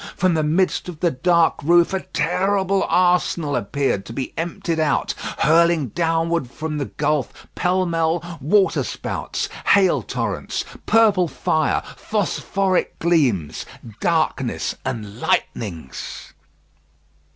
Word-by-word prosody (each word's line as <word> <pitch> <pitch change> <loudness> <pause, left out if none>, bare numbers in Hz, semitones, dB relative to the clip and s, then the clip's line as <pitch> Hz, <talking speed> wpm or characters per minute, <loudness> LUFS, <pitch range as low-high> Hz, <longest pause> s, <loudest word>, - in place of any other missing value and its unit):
From 185 -1 +2
the 160 - +1
midst 170 +4 +1
of 165 -4 -8
the 170 0 +2
dark 170 +5 +2
roof 170 +4 +4
a 190 - +1
terrible 190 +4 0
arsenal 175 -4 +2
appeared 115 -2 -1
to 115 - -8
be 130 +1 -4
emptied 165 0 -2
out, 155 -2 +1 0.2
hurling 165 -1 +3
downward 165 -1 0
from 155 +3 -4
the 140 - -1
gulf, 145 -3 -2
pell 185 +1 +1
mell, 170 0 -1
waterspouts, 190 +7 0 0.2
hail 195 -3 +4
torrents, - - -3 0.2
purple 210 -6 +4
fire, 155 0 0
phosphoric 195 -2 -1
gleams, 135 - +1 0.4
darkness, - - 0
and 105 -1 -5
lightnings. 80 - -3
165 Hz, 110 wpm, -21 LUFS, 145-180 Hz, 0.4 s, roof